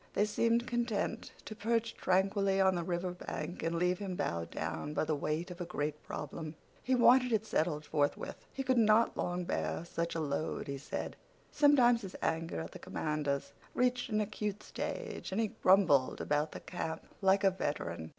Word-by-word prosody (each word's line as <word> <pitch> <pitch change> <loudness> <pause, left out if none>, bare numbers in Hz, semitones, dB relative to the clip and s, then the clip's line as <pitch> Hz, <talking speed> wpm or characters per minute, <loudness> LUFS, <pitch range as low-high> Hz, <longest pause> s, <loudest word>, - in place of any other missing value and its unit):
They 205 - +4
seemed 230 +3 +2
content 235 -2 -1
to - - -6
perch 230 +2 0
tranquilly 195 +1 +2
on 190 -1 +5
the 175 - -1
river 175 +1 -2
bank, 175 -1 -5
and 165 +1 -1
leave 180 +1 +1
him 195 -3 -3
bowed 85 - -2
down 150 +1 -4
by - - +2
the 155 - 0
weight 155 +5 -2
of 180 0 -8
a - - -2
great 150 -3 -3
problem. 155 +1 -6 0.3
He 260 - +2
wanted 250 +1 +6
it 220 -1 +1
settled 155 -6 0
forthwith. 145 -1 -1
He 270 - -3
could 260 -2 +3
not 220 +1 +4
long 175 0 -1
bear 170 -1 -2
such 170 0 -3
a - - 0
load, 150 0 -2
he 140 -1 -4
said. 145 - -5 0.3
Sometimes 250 -5 +5
his 190 -3 -8
anger 165 - -1
at 80 - -7
the - - -9
commanders 150 -3 -2 0.2
reached 250 +1 +1
an 215 -1 +1
acute 210 -1 -3
stage, 470 - -5
and 190 - -1
he 225 -2 +1
grumbled 175 -9 +5
about 150 +1 0
the - - -7
camp 160 -3 -4 0.2
like 195 +1 +4
a 195 - +5
veteran. 85 - -3
185 Hz, 185 wpm, -33 LUFS, 155-220 Hz, 0.3 s, wanted